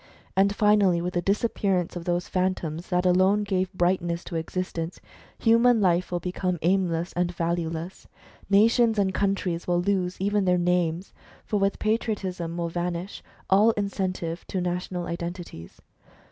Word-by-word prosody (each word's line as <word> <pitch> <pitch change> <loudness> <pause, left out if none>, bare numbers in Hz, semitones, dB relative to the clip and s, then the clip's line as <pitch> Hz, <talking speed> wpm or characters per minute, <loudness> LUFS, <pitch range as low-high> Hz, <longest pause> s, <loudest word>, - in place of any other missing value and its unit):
And 200 +1 +3
finally, 205 -4 +4
with 180 +1 -3
the 175 - 0
disappearance 195 -3 0
of 170 -1 -6
those 175 0 -1
Phantoms 180 -3 -2
that 180 0 +1
alone 185 +3 +4
gave 185 -2 -1
brightness 175 -2 0
to 170 - -7
existence, 165 0 -4 0.4
human 230 +1 +4
life 180 -2 +2
will 175 - 0
become 180 +1 -2
aimless 175 -1 +1
and 175 0 0
valueless. 170 0 -3 0.4
Nations 225 +3 +4
and 195 -2 +1
countries 190 -4 -1
will 175 0 +2
lose 185 -1 -1
even 200 +1 +1
their 180 -1 +3
names, 175 0 0 0.3
for 210 - 0
with 195 0 +1
Patriotism 195 -6 -2
will 170 -1 -2
vanish 175 +2 -4 0.3
all 210 +4 +5
incentive 185 -4 -3
to 190 - -2
national 180 0 -3
identities. 170 - -7
180 Hz, 145 wpm, -26 LUFS, 175-200 Hz, 0.4 s, all